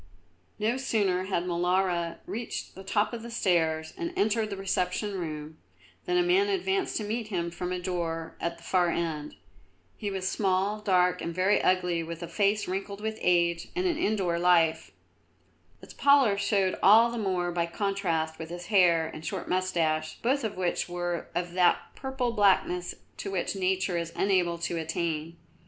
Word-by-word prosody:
No 220 +4 0
sooner 200 -8 0
had 190 -3 -1
Molara 175 -1 0
reached 230 +2 -5
the 190 - -10
top 205 +4 0
of 235 - -5
the 235 - -8
stairs 160 -7 +1
and 335 -1 -4
entered 215 +1 +1
the 200 - -5
reception 195 +1 -1
room, 155 -4 -5 0.5
than 360 0 +1
a 355 - +4
man 375 +3 +3
advanced 385 0 0
to 215 - -2
meet 220 +2 -3
him 170 -5 -2
from 180 +1 -4
a 180 - -1
door 170 -3 -3
at 170 0 -2
the 170 - -17
far 180 -2 +2
end. 160 -3 -3 0.6
He 205 - -3
was 190 -1 -3
small, 195 +1 0
dark, 180 -3 +2
and 170 - -4
very 185 +3 +3
ugly, 180 -2 +2
with 165 +1 -6
a - - -4
face 200 +5 +1
wrinkled 195 +2 -4
with 220 +1 -4
age 170 -1 +2
and 365 +1 0
an 340 -3 0
indoor 190 - 0
life. 165 -2 +3 0.9
Its - - -11
pallor 280 -7 +5
showed 200 -2 +1
all 225 +4 +7
the 235 - -3
more 185 -4 0
by 170 -1 0
contrast 170 -4 -1
with 160 0 -6
his 175 +1 -7
hair 170 -4 +5
and 160 0 -8
short 185 0 -4
moustache, 165 -4 0
both 265 +3 +1
of 215 -4 -3
which 180 -1 -1
were 175 -1 -3
of 175 0 -2
that 180 -1 +4 0.2
purple 265 -2 -2
blackness 190 -4 +2 0.2
to - - -5
which 190 0 -2
Nature 185 -1 0
is 170 0 -4
unable 185 -3 +2
to 170 0 -2
attain. 165 0 -3
185 Hz, 175 wpm, -28 LUFS, 170-210 Hz, 0.9 s, all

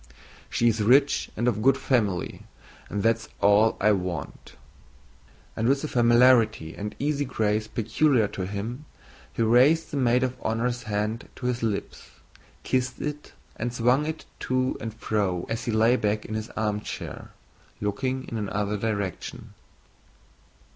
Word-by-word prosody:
She 120 - +2
is 115 -1 +2
rich 135 +6 +4
and 120 +3 0
of 110 -3 +1
good 135 +3 +4
family 105 -10 0 0.5
and 105 - -2
that's 115 0 +1
all 105 +2 +4
I 105 +2 +4
want." 90 -6 -4 1.0
And 115 +2 +1
with 140 +1 +2
the - - -1
familiarity 120 - +4
and 105 +1 -5
easy 145 0 0
grace 110 -4 0
peculiar 115 +1 +2
to 95 -1 -4
him, 110 +8 -5 0.5
he 115 - -1
raised 130 +9 +4
the 145 - -2
maid 125 -1 +3
of 130 -1 0
honor's 120 +2 -1
hand 105 +3 -2
to 125 - -8
his 125 -1 -1
lips, 110 -3 -3 0.5
kissed 125 0 -1
it, 150 0 -5 0.2
and 120 +2 -2
swung 125 +5 +2
it 160 0 -5
to 130 0 0
and 115 - -4
fro 100 -5 -1
as 115 +1 -3
he 120 - -1
lay 110 +3 +4
back 105 -1 -1
in 110 - -6
his 110 +1 -4
armchair, 105 -1 -4 0.5
looking 130 +6 -2
in 115 - -4
another 105 0 -2
direction. 100 -3 -4
115 Hz, 145 wpm, -26 LUFS, 105-125 Hz, 1.0 s, rich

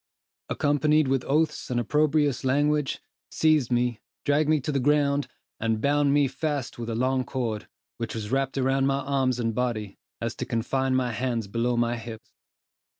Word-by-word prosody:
accompanied 150 +1 +2
with 135 -1 +1
oaths 155 +3 0
and 125 -1 0
opprobrious 145 +1 +1
language, 145 +2 +1 0.3
seized 155 -6 +2
me, 120 -2 +1 0.3
dragged 145 +1 +2
me 155 -1 +4
to 140 - -3
the 140 - +1
ground, 145 +1 +2 0.3
and 110 -1 0
bound 145 +3 +2
me 145 -1 +4
fast 145 -3 -3
with 120 0 -4
a 115 - -2
long 130 +2 +1
cord, 115 -5 -3 0.3
which 115 -1 -4
was 110 -1 -5
wrapped 135 0 0
round 135 +1 +2
my 140 0 +1
arms 130 -3 0
and 115 -1 0
body, 115 -3 -1 0.3
so - - -3
as - - -2
to - - -4
confine 130 +3 0
my 125 -2 +1
hands 120 -1 -2
below 115 +4 -1
my 120 0 +1
hips. 115 -1 -9
130 Hz, 175 wpm, -26 LUFS, 120-145 Hz, 0.3 s, me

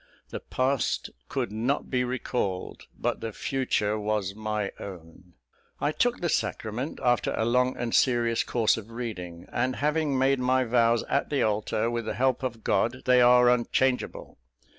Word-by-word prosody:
The - - -5
past 130 0 -1 0.2
could 130 -6 -2
not 120 +7 -1
be 125 -1 +2
recalled; 125 -6 -3
but - - -2
the 115 - -4
future 110 -4 -1
was 105 -2 -1
my 105 -1 -3
own. 90 -1 -10 0.5
"I 145 - +1
took 245 +9 0
the 175 - +1
sacrament 125 -2 -2
after 120 -1 +2
a 110 - +1
long 125 +2 +2
and 120 -1 -3
serious 120 -2 +3
course 115 -2 +2
of 110 0 -8
reading; 95 -8 -6
and, 125 +1 0
having 150 -1 0
made 135 +1 +3
my 130 +1 +2
vows 115 -1 +3
at - - -1
the 145 - +1
altar, 110 +2 0
with 120 -1 -2
the - - -3
help 130 0 +1
of 120 -4 -4
God, 120 +6 0
they 125 -1 +5
are 125 0 +6
unchangeable. 125 +1 0
120 Hz, 160 wpm, -27 LUFS, 110-130 Hz, 0.5 s, are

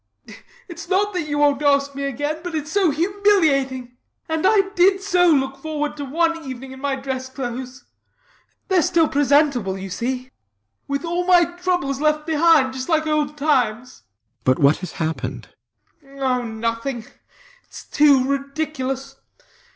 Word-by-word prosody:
It's 340 -1 -9
not 405 +2 +1
that 350 -4 -3
you 290 -1 -2
wont 290 -1 +2
ask 280 -1 +2
me 280 0 -4
again; 290 +3 -3
but 355 -2 -5
it's 305 0 -4
so 390 -2 +3
humiliating. 295 -8 +1 0.3
And 320 +2 +1
I 395 -2 +3
did 385 +1 +4
so 360 -3 +3
look 270 -3 +1
forward 295 0 -3
to 285 - -5
one 330 +3 0
evening 260 -1 -8
in 265 0 -11
my 280 -1 -1
dress 260 -1 -5
clothes 255 0 -6 0.9
(THEYRE 375 -2 +4
still 325 0 +2
presentable, 280 -8 +2
you 190 0 -7
see) 255 +6 -4 0.6
with 280 +4 -3
all 350 +2 -2
my 355 -1 +6
troubles 350 -6 -2
left 305 0 +1
behind, 315 -4 +3
just 260 +4 -6
like 315 -1 +2
old 300 -1 -1
times. 255 -5 0
RIDGEON. - - -46 0.3
But 130 0 +3
what 140 +1 +4
has 180 -3 -8
happened? 135 -6 -4 0.5
BLENKINSOP. 275 0 -15
Oh, 250 -1 +1
nothing. 230 +2 -3 0.6
It's - - -12
too 280 -3 +4
ridiculous. 275 -1 -3
280 Hz, 155 wpm, -21 LUFS, 260-325 Hz, 0.9 s, my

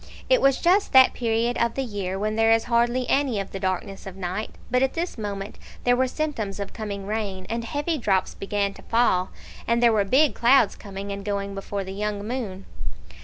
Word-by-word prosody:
It - - +5
was 275 -1 +4
just 375 +2 +2
that 260 -1 +8
period 235 0 0
of 235 0 +1
the 270 - -1
year 200 -5 -3
when 215 +2 -1
there 225 0 +4
is 225 0 +4
hardly 240 +1 +1
any 270 -6 +1
of 195 - -5
the 195 - -5
darkness 190 +1 -3
of 190 - -8
night; 190 +3 -3 0.2
but 250 0 +3
at 265 0 +2
this 340 +2 -2
moment 205 -2 -5 0.2
there 245 0 +4
were 260 +1 +2
symptoms 250 -9 -3
of 200 -1 -5
coming 200 -3 -5
rain, 200 -3 -3
and 230 0 -2
heavy 295 +6 -2
drops 195 -5 +1
began 200 0 -1
to - - -13
fall; 225 -6 +2 0.4
and 235 - +3
there 235 -1 +6
were 210 -2 +3
big 265 +9 +3
clouds 240 -2 +4
coming 200 0 -7
and 200 0 -5
going 200 -1 -2
before 195 0 -4
the 190 0 -7
young 205 0 -3
moon. 215 -6 -4
215 Hz, 210 wpm, -25 LUFS, 195-245 Hz, 0.4 s, that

